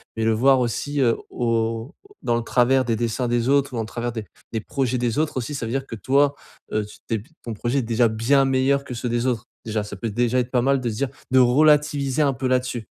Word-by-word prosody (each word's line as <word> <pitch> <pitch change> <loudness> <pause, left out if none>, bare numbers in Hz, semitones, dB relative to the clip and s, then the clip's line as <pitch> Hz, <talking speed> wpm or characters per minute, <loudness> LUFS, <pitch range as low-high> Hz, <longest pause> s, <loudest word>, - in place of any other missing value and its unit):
mais 110 - -2
le 115 - +3
voir 130 +4 +4
aussi, 140 +4 -1
heu, 115 -3 +3
au 115 0 -1 0.3
dans 120 0 +1
le - - -1
travers 130 +2 +3
des 115 -2 0
dessins 120 +2 -1
des 120 +1 0
autres 140 -1 +2
ou - - -3
en - - 0
travers 120 +2 -4
des 110 -2 -4 0.3
des 110 - -1
projets 130 -1 -1
des 120 +3 0
autres 155 -3 0
aussi 135 +4 -3
ça 125 - -3
veut 115 - -4
dire 135 0 -1
que 115 - -6
toi, 140 +6 +2 0.4
heu, 105 -1 0
tu 105 - -13
t'es 115 - 0
b 105 - -15 0.2
ton 115 - -5
projet 120 +6 -1
est - - +1
déjà 115 +1 +2
bien 120 +5 +2
meilleur 135 +1 +2
que 125 - -6
ceux 120 +1 -3
des 120 +1 0
autres. 120 -2 -1 0.2
Déjà, 110 -1 -1
ça 105 0 -7
peut 115 +3 -3
déjà 120 +3 +1
être 125 0 -2
pas 125 -2 +2
mal 135 +1 +2
de 120 - -1
se 110 - -4
dire 135 +3 -1 0.2
de 130 - +5
relativiser 145 +1 +3
un 140 -2 +3
peu 130 +1 -2
là-dessus. 125 -2 -1
120 Hz, 260 wpm, -23 LUFS, 115-135 Hz, 0.4 s, de